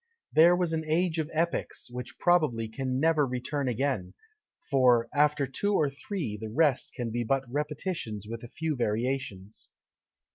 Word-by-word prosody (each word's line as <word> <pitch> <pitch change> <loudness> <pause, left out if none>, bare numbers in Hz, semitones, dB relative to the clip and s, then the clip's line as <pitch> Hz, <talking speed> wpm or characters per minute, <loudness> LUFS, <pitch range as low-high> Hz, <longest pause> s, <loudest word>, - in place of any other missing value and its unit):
There 170 +3 +7
was 175 -2 0
an 160 0 -1
age 165 +1 +1
of 155 -1 -2
epics, 165 +2 -2
which 125 0 -7
probably 155 -11 +2
can 130 +3 -2
never 160 0 +3
return 130 +2 -2
again; 125 -6 -1 0.6
for 125 -4 +4
after 150 -1 +3
two 200 +10 -1
or 145 -5 +2
three, 140 - -4
the 110 +1 -6
rest 145 +2 +2
can 120 -3 -3
be 120 +1 -1
but 135 +3 +1
repetitions 145 - -3
with 115 +1 -6
a 120 - -8
few 155 +5 -3
variations. 115 -3 -3
135 Hz, 155 wpm, -28 LUFS, 120-160 Hz, 0.6 s, There